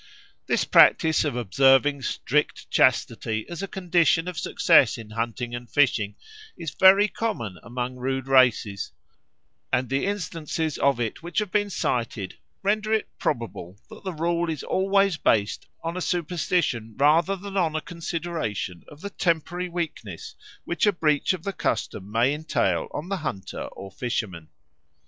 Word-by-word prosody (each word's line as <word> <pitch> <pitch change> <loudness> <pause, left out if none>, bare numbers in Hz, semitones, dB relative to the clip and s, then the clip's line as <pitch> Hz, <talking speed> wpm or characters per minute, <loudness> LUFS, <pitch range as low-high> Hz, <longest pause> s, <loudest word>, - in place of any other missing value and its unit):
This - - +1
practice 160 -1 +5
of 145 -5 -2
observing 135 +5 +3
strict 150 +3 -1
chastity 115 -3 +2
as 170 +1 -6
a 195 - -3
condition 175 -2 +2
of 180 - -4
success 125 -2 +4
in 110 -2 -10
hunting 120 +2 -3
and 120 -1 -6
fishing 115 -8 +2 0.4
is 165 -4 -5
very 195 +4 +6
common 115 - -4
among 125 +1 -5
rude 130 +1 -2
races; 125 -7 +3 0.8
and 130 -1 +1
the 135 +7 0
instances 165 -5 -3
of 140 -3 +2
it 115 -3 -3
which 170 +2 -8
have 210 -3 +1
been 205 -1 +1
cited 115 - -2 0.2
render 215 +2 0
it 220 -1 +1
probable 100 -5 -3
that - - -12
the 190 - -3
rule 170 +1 0
is 155 -3 -4
always 195 -1 +2
based 105 -7 +1 0.2
on 165 +1 -3
a 185 - -3
superstition 155 - -1
rather 160 +7 +4
than 195 +1 -8
on 165 -5 +1
a - - +1
consideration 165 - -4
of 150 +1 -14
the 200 - -6
temporary 175 0 -1
weakness 155 - -5 0.3
which 175 +4 0
a - - +6
breach 155 -5 +1
of 185 -4 -4
the 200 - -3
custom 100 - -3
may 120 +5 +3
entail 155 +2 0
on 160 +5 -6
the 195 - -1
hunter 100 - -5
or 95 0 -10
fisherman. 95 -10 -4
150 Hz, 155 wpm, -25 LUFS, 120-175 Hz, 0.8 s, very